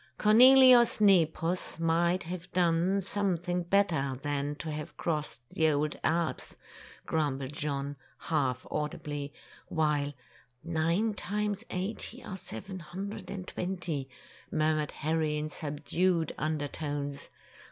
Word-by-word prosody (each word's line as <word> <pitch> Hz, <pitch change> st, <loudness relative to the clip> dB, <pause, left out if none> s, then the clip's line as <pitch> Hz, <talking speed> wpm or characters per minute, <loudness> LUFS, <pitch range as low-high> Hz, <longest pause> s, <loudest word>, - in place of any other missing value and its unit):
'^Cornelius 250 Hz, +2 st, +7 dB
Nepos 180 Hz, -4 st, +3 dB
might 170 Hz, +2 st, +2 dB
have 175 Hz, +2 st, -7 dB
done 175 Hz, +2 st, +2 dB
some 195 Hz, -1 st, 0 dB
thing 175 Hz, +1 st, -2 dB
better 170 Hz, -8 st, +1 dB
than 145 Hz, 0 st, -1 dB
to 155 Hz, +1 st, -5 dB
have 150 Hz, 0 st, -6 dB
crossed 150 Hz, -7 st, -3 dB
the 160 Hz, -1 st, +2 dB
old 150 Hz, 0 st, 0 dB
Alps,'" 160 Hz, -4 st, -1 dB, 0.5 s
grumbled 140 Hz, -3 st, -1 dB
John, 145 Hz, -2 st, -3 dB, 0.2 s
half 135 Hz, -6 st, -1 dB
audibly; 145 Hz, -1 st, -3 dB, 0.4 s
while, 150 Hz, -3 st, 0 dB, 0.5 s
''Nine 170 Hz, +7 st, +1 dB
times 210 Hz, +1 st, -2 dB
eighty 210 Hz, +6 st, -4 dB
are 190 Hz, -, -6 dB
seven 185 Hz, -, -7 dB
hundred 190 Hz, +6 st, -7 dB
and 185 Hz, -2 st, -6 dB
twenty," 175 Hz, -7 st, -3 dB, 0.4 s
murmured 155 Hz, -1 st, +1 dB
Harry 155 Hz, 0 st, 0 dB
in 150 Hz, +1 st, -3 dB
subdued 160 Hz, +3 st, -1 dB
under 155 Hz, -1 st, -1 dB
tones. 145 Hz, -1 st, -4 dB
160 Hz, 115 wpm, -30 LUFS, 150-185 Hz, 0.5 s, ^Cornelius